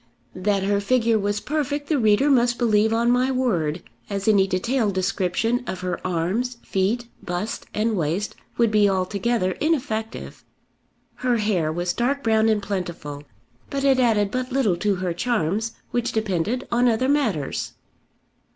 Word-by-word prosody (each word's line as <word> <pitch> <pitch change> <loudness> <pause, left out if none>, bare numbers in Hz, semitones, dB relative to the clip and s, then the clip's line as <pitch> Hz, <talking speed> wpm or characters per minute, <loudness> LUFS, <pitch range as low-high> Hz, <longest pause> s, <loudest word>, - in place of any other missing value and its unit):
That 195 +1 0
her 200 +1 +1
figure 230 0 +2
was 205 +1 -1
perfect 290 +2 -2
the 305 -4 +1
reader 215 +4 +4
must 240 -2 +3
believe 220 -2 +3
on 235 +1 +2
my 250 +1 +2
word, 185 - 0 0.3
as 200 0 -3
any 200 -3 +5
detailed 210 +2 0
description 195 +5 0
of 185 - -4
her 180 -1 -2
arms, 185 +8 -1
feet, 205 +6 0 0.2
bust, 180 +5 -4
and 220 +1 0
waist, 175 +4 -1 0.2
would 235 -2 +3
be 210 -1 +4
altogether 195 +2 0
ineffective. 260 -8 -2 0.7
Her 250 -2 +1
hair 195 -8 0
was 175 +2 -1
dark 275 +6 0
brown 220 -1 +3
and 210 -2 +1
plentiful; 175 -7 -4 0.5
but 275 -1 -2
it 270 -2 +4
added 215 -5 +2
but 255 +2 -3
little 245 -9 +2
to 205 +2 +1
her 180 -1 -2
charms, 220 +1 -1 0.2
which 240 0 -1
depended 215 +3 -1
on 240 +1 +3
other 235 +3 +1
matters. 230 - 0
215 Hz, 150 wpm, -23 LUFS, 185-245 Hz, 0.7 s, any